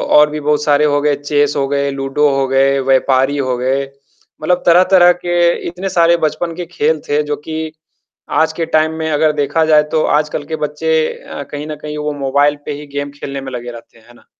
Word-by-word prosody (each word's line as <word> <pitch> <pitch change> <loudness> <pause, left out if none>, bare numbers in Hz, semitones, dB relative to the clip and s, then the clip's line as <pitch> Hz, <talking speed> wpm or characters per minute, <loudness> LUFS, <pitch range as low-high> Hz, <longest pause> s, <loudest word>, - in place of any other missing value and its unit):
और 150 0 +6
भी 150 0 -5
बहुत 150 0 0
सारे 150 0 +3
हो 145 -1 +1
गए, 145 -1 +2
चेस 145 0 0
हो 135 -1 0
गए, 140 0 0
लूडो 135 +2 0
हो 135 -1 0
गए, 135 +1 +2
व्यापारी 135 +1 +2
हो 130 -2 -1
गए। 130 +2 0 0.6
मतलब 180 +3 +1
तरह-तरह 180 +1 +6
के 175 0 -4 0.3
इतने 180 +3 -4
सारे 170 -1 +3
बचपन 165 +2 -3
के 175 0 -5
खेल 160 -2 0
थे 145 +1 +2
जो 150 0 -2
कि 160 0 -4 0.7
आज 160 0 +1
के 165 0 -2
टाइम 155 0 +3
में 160 0 -2
अगर 155 +1 +2
देखा 150 +2 0
जाए 155 -1 +5
तो 155 - +1
आजकल 150 -1 -2
के 160 - -4
बच्चे 150 +2 -3 0.2
अ, 140 - -9
कहीं 145 +1 -6
न 155 - -5
कहीं 150 0 -6
वो 150 0 -3
मोबाइल 145 +2 +2
पे 150 - -3
ही 150 - -11
गेम 145 0 -3
खेलने 140 -1 -5
में 135 0 -7
लगे 120 0 -6
रहते 115 0 -13
हैं। 110 - -24
है 120 - -17
ना? - - -22
150 Hz, 220 wpm, -16 LUFS, 140-160 Hz, 0.7 s, और